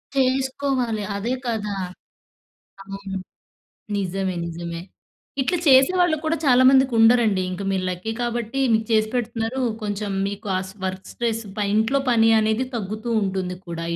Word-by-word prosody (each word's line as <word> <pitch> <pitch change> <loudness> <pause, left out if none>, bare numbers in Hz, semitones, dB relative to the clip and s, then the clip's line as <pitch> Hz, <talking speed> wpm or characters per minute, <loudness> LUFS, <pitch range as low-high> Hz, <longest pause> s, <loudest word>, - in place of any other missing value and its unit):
చేసుకోవాలి. 260 -3 0
అదే 230 +5 -2
కదా! 210 -3 -2 1.1
అవును. 195 0 -6 0.8
నిజమే 190 -1 -2
నిజమే. 170 0 -5 0.6
ఇట్ల 265 - 0
చేసేవాళ్ళు 315 +5 +5
కూడా 320 +1 +1
చాలా 255 -2 +5
మందికి 265 -1 +5
ఉండరండి 225 -4 +5
ఇంక 185 +2 -5
మీరు 190 -1 -1
లక్కీ 180 +5 -4
కాబట్టి 240 +2 -2
మీకు 220 0 +2
చేసి 215 0 +3
పెడుతున్నారు. 235 +1 -2 0.2
కొంచెం 205 -1 -3 0.2
మీకు 200 +1 -7
ఆ - - +1 0.3
వర్క్ 190 0 -5
స్ట్రెస్ 230 -1 -2 0.3
ఇంట్లో 225 +6 +2
పని 225 -1 +5
అనేది 220 +4 +1
తగ్గుతూ 215 +2 -4
ఉంటుంది 190 -1 -2
కూడా 165 0 -4
220 Hz, 130 wpm, -23 LUFS, 195-255 Hz, 1.1 s, చేసేవాళ్ళు